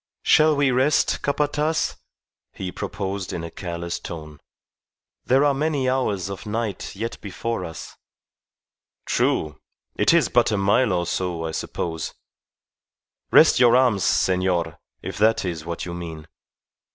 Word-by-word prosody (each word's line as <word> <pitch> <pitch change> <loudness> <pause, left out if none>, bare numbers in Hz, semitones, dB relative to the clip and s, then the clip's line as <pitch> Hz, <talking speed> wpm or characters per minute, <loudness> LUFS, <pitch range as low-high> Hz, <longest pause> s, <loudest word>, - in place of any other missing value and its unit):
"Shall 155 0 +5
we 140 -2 +2
rest, 130 +4 +2
Capataz?" 150 +2 0 0.6
he 95 -1 -5
proposed 95 0 -4
in 85 - -4
a 85 - -6
careless 85 -1 -5
tone. 75 -3 -8 0.9
"There 135 +3 +4
are 145 - +3
many 145 -2 0
hours 105 -8 0
of 100 +2 -7
night 110 -2 -3
yet 115 +4 -5
before 105 +1 -4
us." 80 -2 -8 1.1
"True. 75 -1 0 0.4
It - - +3
is - - +4
but - - +3
a 105 - +1
mile 100 +4 +3
or 90 -1 0
so, 85 -1 -2
I 80 - -3
suppose. 80 0 -4 1.1
Rest - - +6
your 120 -1 +6
arms, 120 -7 +3
senor, 90 -3 +1 0.2
if - - -6
that 110 -1 +3
is 85 -3 -4
what 85 0 -4
you 85 - -6
mean. 80 -3 -7
100 Hz, 140 wpm, -23 LUFS, 85-130 Hz, 1.1 s, Rest